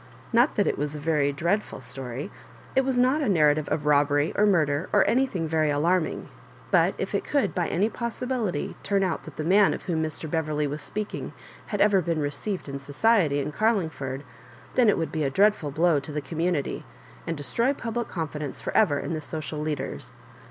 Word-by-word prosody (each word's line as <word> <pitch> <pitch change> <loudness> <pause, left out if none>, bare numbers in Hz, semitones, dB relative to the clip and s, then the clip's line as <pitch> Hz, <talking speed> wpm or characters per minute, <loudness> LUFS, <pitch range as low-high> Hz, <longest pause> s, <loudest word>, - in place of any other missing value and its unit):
Not 240 +5 +4
that 205 - +2
it - - -1
was 145 +1 -2
a - - -5
very 145 -2 +1
dreadful 170 +9 -1
story. 130 +5 -6 0.4
It 265 - +4
was 260 -1 0
not 255 +5 +3
a 275 - +1
narrative 155 -4 +3
of 150 - -1
robbery 145 0 +3
or 210 - +4
murder, 155 -5 +2
or - - +4
anything 235 -10 +1
very 155 -1 +1
alarming; 165 +4 +1 0.4
but - - +4
if - - -4
it - - 0
could 285 -2 0
by 175 -3 0
any 195 +6 +1
possibility 235 - -3
turn 200 -1 +1
out 185 - -2
that - - -10
the 155 - -3
man 195 +5 +4
of - - -9
whom 165 -3 -1
Mr. 155 0 -4
Beverley 155 -1 -1
was 145 +1 -4
speaking 215 +5 -4 0.3
had 205 -3 -2
ever 205 -2 +5
been 165 -1 -1
received 155 +7 -3
in 140 0 -5
society 150 +2 +2
in 150 - -3
Garlingford, 160 - -1 0.5
then 245 -4 +4
it - - +3
would 165 - -2
be 155 -2 -1
a 140 - +1
dreadful 195 -1 +3
blow 160 +1 +3
to 140 +2 -8
the 150 - -2
community, 160 0 -2 0.4
and 165 -1 -2
destroy 190 - +1
public 235 -4 -3
confidence 150 -4 -4
for - - -5
ever 165 -10 +4
in 165 - -3
the 155 - -3
social 155 0 -5
leaders. 150 -1 -4
160 Hz, 195 wpm, -26 LUFS, 145-205 Hz, 0.5 s, ever